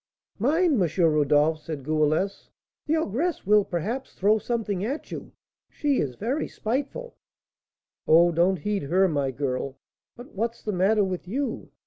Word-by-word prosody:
"Mind, 300 Hz, -, +2 dB
M. 175 Hz, -, +2 dB
Rodolph," 150 Hz, 0 st, +3 dB
said 155 Hz, -3 st, -6 dB
Goualeuse; 155 Hz, +6 st, 0 dB, 0.4 s
"the 310 Hz, -, +2 dB
ogress 315 Hz, -, -1 dB
will, 210 Hz, +1 st, +5 dB
perhaps, 210 Hz, +10 st, -4 dB
throw 210 Hz, +3 st, +3 dB
something 210 Hz, -5 st, -2 dB
at 270 Hz, +8 st, -4 dB
you, -, -, -7 dB, 0.4 s
she 290 Hz, -3 st, 0 dB
is 130 Hz, -4 st, -2 dB
very 250 Hz, -, -2 dB
spiteful." 280 Hz, -, -4 dB, 0.9 s
"Oh, 170 Hz, +2 st, +6 dB
don't 175 Hz, +3 st, +2 dB
heed 205 Hz, +5 st, -2 dB
her, 185 Hz, +7 st, +2 dB
my 145 Hz, -5 st, 0 dB
girl. 130 Hz, 0 st, -3 dB, 0.4 s
But 245 Hz, +2 st, -12 dB
what's 230 Hz, +4 st, -3 dB
the 210 Hz, -, -2 dB
matter 200 Hz, +4 st, +3 dB
with 185 Hz, -2 st, -3 dB
you? 270 Hz, +8 st, -3 dB
195 Hz, 145 wpm, -26 LUFS, 155-240 Hz, 0.9 s, Oh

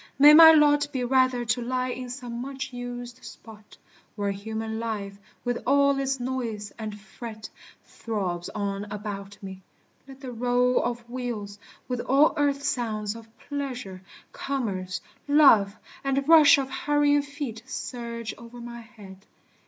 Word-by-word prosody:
May 290 Hz, +2 st, +9 dB
my 320 Hz, +1 st, +11 dB
lot 290 Hz, -2 st, +4 dB
Be 260 Hz, -3 st, -2 dB
rather 255 Hz, -1 st, +2 dB
to 230 Hz, +2 st, 0 dB
lie 255 Hz, +1 st, -1 dB
in 250 Hz, 0 st, -5 dB
some 245 Hz, -2 st, -6 dB
much 270 Hz, +1 st, -6 dB
used 245 Hz, 0 st, -7 dB
spot, 215 Hz, -2 st, -13 dB, 0.4 s
Where 200 Hz, -2 st, -1 dB
human 220 Hz, +2 st, -4 dB
life, 205 Hz, -3 st, -4 dB, 0.3 s
with 245 Hz, 0 st, -1 dB
all 280 Hz, 0 st, +4 dB
its 270 Hz, -1 st, -1 dB
noise 235 Hz, -5 st, -4 dB
and 215 Hz, -1 st, -6 dB
fret, 215 Hz, +2 st, -9 dB, 0.4 s
Throbs 185 Hz, -6 st, -4 dB
on 200 Hz, -1 st, -2 dB
about 205 Hz, -1 st, -7 dB
me. 190 Hz, -1 st, -8 dB, 0.5 s
Let 270 Hz, -1 st, -12 dB
the 260 Hz, -2 st, -6 dB
roll 245 Hz, +1 st, +2 dB
of 240 Hz, -1 st, -4 dB
wheels, 235 Hz, -5 st, -5 dB, 0.3 s
With 250 Hz, -1 st, -2 dB
all 275 Hz, +5 st, +4 dB
earth's 285 Hz, -1 st, 0 dB
sounds 215 Hz, -3 st, -2 dB
of 230 Hz, -1 st, -11 dB, 0.2 s
pleasure, 255 Hz, -10 st, -5 dB, 0.3 s
commerce, 200 Hz, -10 st, -3 dB, 0.3 s
love, 230 Hz, -9 st, +6 dB, 0.3 s
And 275 Hz, 0 st, 0 dB
rush 310 Hz, -3 st, +8 dB
of 270 Hz, -1 st, -3 dB
hurrying 290 Hz, 0 st, +2 dB
feet 280 Hz, -6 st, -6 dB
surge 235 Hz, -3 st, -5 dB
o'er 235 Hz, +1 st, -11 dB
my 235 Hz, 0 st, -8 dB
head. 205 Hz, -4 st, -14 dB
240 Hz, 145 wpm, -26 LUFS, 215-270 Hz, 0.5 s, my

